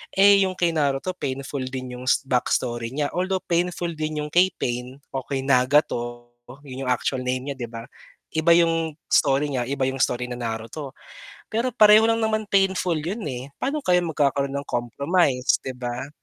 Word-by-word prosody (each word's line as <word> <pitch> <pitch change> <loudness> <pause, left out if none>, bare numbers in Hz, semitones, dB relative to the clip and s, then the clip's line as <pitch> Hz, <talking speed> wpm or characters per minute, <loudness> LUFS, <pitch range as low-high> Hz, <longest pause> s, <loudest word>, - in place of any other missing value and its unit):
Eh, 200 0 +6
yung 185 - -5
kay 175 -2 +1
Naruto 145 +1 0
painful 135 +1 -4
din 130 -1 -6
yung 125 - -9 0.2
backstory 120 -2 0
niya 145 -1 -1
although 185 +1 -1
painful 175 0 -1
din 155 -1 -3
yung 150 - -7
kay 180 +2 +5
Pain 125 +1 -3 0.2
o 135 -1 -4
kay 135 -2 -2
Nagato 125 -3 +1 0.4
yun 130 +1 -6
yung - - +2
actual 125 +1 -1
name 130 +2 -2
niya, - - -5
'di 120 - -4
ba? 115 -1 -7 0.5
Iba 160 +1 +2
yung 165 -2 +2 0.2
story 145 0 +3
niya, 125 -2 -1
iba 140 0 -1
yung 135 0 -3
story 125 -1 0
na - - -3
Naruto. 115 +5 -5 0.6
Pero 230 +4 +1
pareho 215 -1 +7
lang 230 0 +2
naman 215 0 0
painful 190 -3 +2
yun 190 +9 -4
eh, 130 +1 -6
paano 295 +3 -1
kaya 180 -1 +4
magkakaroon 140 -3 0
ng 140 - -4
compromise, 135 +3 +1
'di 130 - -6
ba? 125 +2 -5
140 Hz, 180 wpm, -24 LUFS, 125-175 Hz, 0.6 s, pareho